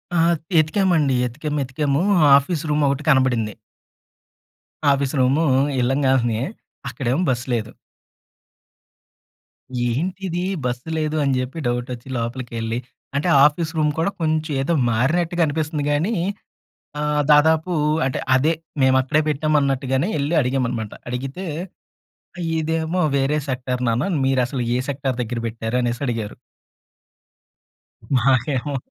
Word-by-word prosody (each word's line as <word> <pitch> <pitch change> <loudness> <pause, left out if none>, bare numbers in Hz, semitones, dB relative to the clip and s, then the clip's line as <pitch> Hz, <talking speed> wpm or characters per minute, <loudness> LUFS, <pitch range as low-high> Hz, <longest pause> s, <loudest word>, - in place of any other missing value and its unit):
ఆ! - - +3 0.4
ఎతికామండి. 155 -4 +2
ఎతికాం. 150 +5 -5
ఏతికాము 140 +3 -1 0.4
ఆఫీస్ 150 +2 -3
రూమొకటి 150 -1 +1
కనబడింది. 125 -6 +2 1.4
Office 140 -1 0
room 135 +6 +3 0.4
ఎళ్ళంగాలినే 130 -3 +1 0.5
అక్కడేమో 135 +2 -1
బస్సు 120 0 -1
లేదు. 115 -2 -2 2.2
ఏంటిది 180 +6 -2 0.2
బస్సు 125 +4 -3
లేదు 155 0 -1
అని 140 - +1
చెప్పి 130 +5 -4
డౌటొచ్చి 125 +1 -4
లోపలికెళ్లి, 115 -1 -3 0.4
అంటే 145 +5 0 0.2
ఆఫీస్ 155 +2 +1
రూమ్ 150 -1 +2
కూడా 170 +5 +1
కొంచెం 155 0 0
ఏదో 170 +5 0 0.2
మారినట్టుగా 170 +8 +1
అనిపిస్తుంది 150 0 -2
కానీ 165 +10 +1 0.9
ఆహ్, 150 0 +1
దాదాపు 160 +3 +4 0.4
అంటే 130 - -1 0.2
అదే 145 +5 +3 0.3
మేము 130 0 +4
అక్కడే 145 +4 +1
పెట్టాం 155 +1 0
అన్నట్టుగానే 135 +2 0
వెళ్లి 145 +3 -1
అడిగాం 130 0 0
అన్నమాట. 110 -4 -4 0.2
అడిగితే 135 +9 -5 1.2
"ఇదేమో 160 +3 -1 0.2
వేరే 140 +3 +1
సెక్టార్ 125 0 -2
నాన్న 120 +10 +1 0.2
మీరసలు 130 -1 0
ఏ - - -1
సెక్టార్ 135 -2 -2
దగ్గర 120 0 -3
పెట్టారు" 115 +1 -3
అనేసి 120 +1 -2
అడిగారు. 115 -4 -3 1.8
మాకేమో 135 +3 +1
135 Hz, 110 wpm, -21 LUFS, 125-155 Hz, 2.2 s, దాదాపు